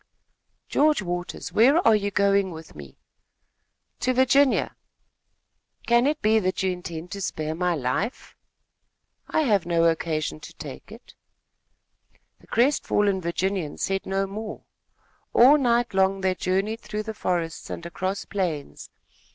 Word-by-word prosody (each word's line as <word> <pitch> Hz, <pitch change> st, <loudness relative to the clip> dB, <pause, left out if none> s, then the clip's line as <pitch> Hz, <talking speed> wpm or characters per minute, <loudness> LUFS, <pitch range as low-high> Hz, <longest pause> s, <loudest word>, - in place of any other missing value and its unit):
"George 300 Hz, -7 st, +2 dB
Waters, 175 Hz, 0 st, -5 dB
where 260 Hz, +8 st, +5 dB
are 225 Hz, -, +7 dB
you 205 Hz, -1 st, 0 dB
going 200 Hz, -1 st, +2 dB
with 160 Hz, -2 st, -10 dB
me?" 70 Hz, -3 st, -12 dB, 1.0 s
"To 255 Hz, 0 st, 0 dB
Virginia." 260 Hz, +2 st, +3 dB, 1.1 s
"Can 235 Hz, +2 st, +4 dB
it 300 Hz, +1 st, -1 dB
be 220 Hz, +1 st, +4 dB
that 185 Hz, -1 st, -1 dB
you 190 Hz, -, +1 dB
intend 175 Hz, -1 st, -7 dB
to 200 Hz, -, -5 dB
spare 155 Hz, -3 st, -3 dB
my 175 Hz, +1 st, 0 dB
life?" 150 Hz, -, -3 dB, 0.9 s
"I -, -, +1 dB
have 205 Hz, -, +1 dB
no 170 Hz, -1 st, +2 dB
occasion 160 Hz, -2 st, 0 dB
to 165 Hz, +2 st, -12 dB
take 155 Hz, +5 st, -10 dB
it." 230 Hz, +3 st, -13 dB, 1.3 s
The -, -, -22 dB
crestfallen 205 Hz, -6 st, +2 dB
Virginian 175 Hz, -1 st, -2 dB
said 195 Hz, 0 st, -2 dB
no 195 Hz, 0 st, 0 dB
more. 210 Hz, +2 st, -7 dB, 0.7 s
All 275 Hz, +5 st, +7 dB
night 240 Hz, -3 st, +1 dB
long 190 Hz, 0 st, +2 dB
they 190 Hz, -1 st, +2 dB
journeyed 195 Hz, +5 st, -1 dB
through 215 Hz, 0 st, -4 dB
the 220 Hz, 0 st, -5 dB
forests 170 Hz, -5 st, -3 dB
and 170 Hz, -, -6 dB
across 185 Hz, +3 st, -3 dB
plains. 160 Hz, -, -4 dB
195 Hz, 135 wpm, -25 LUFS, 170-220 Hz, 1.3 s, are